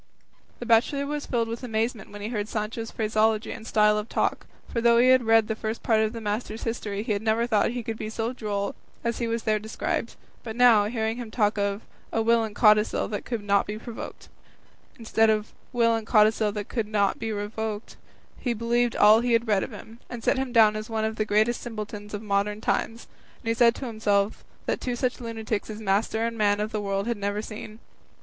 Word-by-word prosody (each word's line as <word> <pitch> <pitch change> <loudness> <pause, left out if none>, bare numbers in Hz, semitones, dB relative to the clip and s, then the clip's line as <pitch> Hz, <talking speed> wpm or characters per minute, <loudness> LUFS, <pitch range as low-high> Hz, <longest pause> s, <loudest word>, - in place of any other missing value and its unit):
The 240 - -7
bachelor 240 +5 +3
was 295 0 -4
filled 230 -3 0
with 230 +1 -5
amazement 225 -2 -2
when 205 0 -8
he 210 - -3
heard 210 -3 -3
Sancho's 225 +1 -3
phraseology 220 0 +1
and 220 - -8
style 210 0 +4
of 210 - -6
talk, - - -1 0.2
for 235 - -2
though 235 0 +5
he 250 +2 +5
had 255 -2 +5
read 225 -1 +5
the 220 - -2
first 220 +1 -4
part 225 -2 +3
of 220 0 +1
his 230 -1 -7
master's 215 +1 -3
history 210 -3 -3
he 210 -3 -1
never 220 +2 +1
thought 215 -4 +2
that 235 - -1
he 245 -1 -4
could 225 -1 -5
be 215 - -4
so 225 +2 -2
droll 205 -4 -3 0.3
as 235 -1 -1
he 235 - -1
was 230 0 -2
there 215 -1 +1
described; 220 +2 -3 0.3
but 220 -2 -6
now, 235 -4 +6
hearing 220 +1 -2
him 240 -3 -6
talk 210 -1 +1
of 200 +1 -1 0.3
a - - 0
"will 230 +1 +3
and 215 -2 -5
codicil 210 -1 +4
that 205 - -4
could 235 -4 -3
not 200 -1 +2
be 210 +1 -4
provoked," 230 0 -8 0.7
instead 225 -1 +2
of 215 0 0 0.2
"will 230 -2 +3
and 225 -1 -2
codicil 215 -1 +4
that 205 -1 -5
could 225 -4 -2
not 205 -2 +1
be 225 - -3
revoked," 210 +1 -4 0.4
he 245 -2 -1
believed 235 +1 +1
all 215 +2 +7
he 240 0 +1
had 230 0 +2
read 205 -3 +3
of - - -3
him, 225 +1 -11
and 240 -2 -7
set 270 - +2
him 265 -2 -2
down 220 -3 +5
as 215 +1 -5
one 220 -1 -1
of 220 0 -3
the 215 - 0
greatest 215 +3 +2
simpletons 210 -2 -6
of 205 - -6
modern 205 0 0
times; 225 +1 -2 0.4
and 225 - -3
he - - +3
said 235 0 +4
to 270 - -6
himself 210 -3 0 0.2
that - - -1
two 250 -1 -2
such 250 +1 -2
lunatics 225 -3 -3
as 215 0 -6
master 220 +2 0
and 230 -1 -4
man 205 -1 +3
the 215 -1 -3
world 195 0 -1
had 235 -1 -1
never 205 +1 -2
seen. 215 0 -8
220 Hz, 225 wpm, -26 LUFS, 210-230 Hz, 0.7 s, all